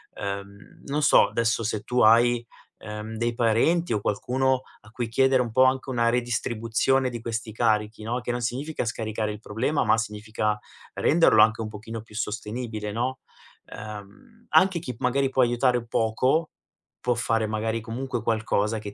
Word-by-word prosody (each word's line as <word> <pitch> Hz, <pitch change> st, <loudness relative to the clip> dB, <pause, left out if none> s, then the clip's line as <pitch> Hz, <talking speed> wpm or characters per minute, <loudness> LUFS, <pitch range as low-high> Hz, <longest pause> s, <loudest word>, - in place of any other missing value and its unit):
uhm, 100 Hz, 0 st, -7 dB
non 145 Hz, +2 st, -1 dB
so -, -, +6 dB
adesso 115 Hz, 0 st, 0 dB
se 110 Hz, -1 st, -2 dB
tu 125 Hz, 0 st, -1 dB
hai, 120 Hz, +2 st, +5 dB, 0.3 s
ehm, 105 Hz, +1 st, -7 dB
dei 120 Hz, +1 st, 0 dB
parenti 120 Hz, +8 st, +2 dB
o 105 Hz, -, 0 dB
qualcuno 130 Hz, +6 st, 0 dB, 0.2 s
a 110 Hz, -, -17 dB
cui 120 Hz, -1 st, -3 dB
chiedere 130 Hz, +2 st, +3 dB
un 120 Hz, -2 st, -3 dB
po' 130 Hz, +2 st, +5 dB
anche 130 Hz, +1 st, +1 dB
una 120 Hz, -2 st, +2 dB
redistribuzione 120 Hz, +2 st, 0 dB
di 120 Hz, -2 st, -6 dB
questi 115 Hz, -1 st, -4 dB
carichi, 110 Hz, -1 st, 0 dB
no, 120 Hz, +3 st, -2 dB
che 120 Hz, -, -3 dB
non 120 Hz, 0 st, -3 dB
significa 135 Hz, +7 st, -3 dB
scaricare 110 Hz, -2 st, -2 dB
il 105 Hz, -, -7 dB
problema, 115 Hz, +7 st, -1 dB
ma -, -, +4 dB
significa 105 Hz, -1 st, -2 dB, 0.3 s
renderlo 160 Hz, -9 st, +4 dB
anche 110 Hz, +1 st, +4 dB
un 110 Hz, -, -4 dB
pochino 110 Hz, +2 st, -7 dB
più 105 Hz, -1 st, -16 dB
sostenibile, 110 Hz, 0 st, -4 dB
no, 125 Hz, +4 st, -2 dB, 0.5 s
ehm, 105 Hz, -, -11 dB
anche 190 Hz, -2 st, +4 dB
chi 130 Hz, -6 st, -6 dB
magari 135 Hz, +2 st, +1 dB
può 130 Hz, 0 st, +2 dB
aiutare 125 Hz, +1 st, +2 dB
un 120 Hz, -1 st, -6 dB
poco, 130 Hz, +9 st, +1 dB, 0.5 s
può 125 Hz, -1 st, +1 dB
fare 115 Hz, -1 st, 0 dB
magari 110 Hz, +1 st, -2 dB
comunque 120 Hz, +2 st, -4 dB
qualcosa 110 Hz, -1 st, 0 dB
che 105 Hz, -1 st, -8 dB
115 Hz, 170 wpm, -25 LUFS, 110-125 Hz, 0.5 s, so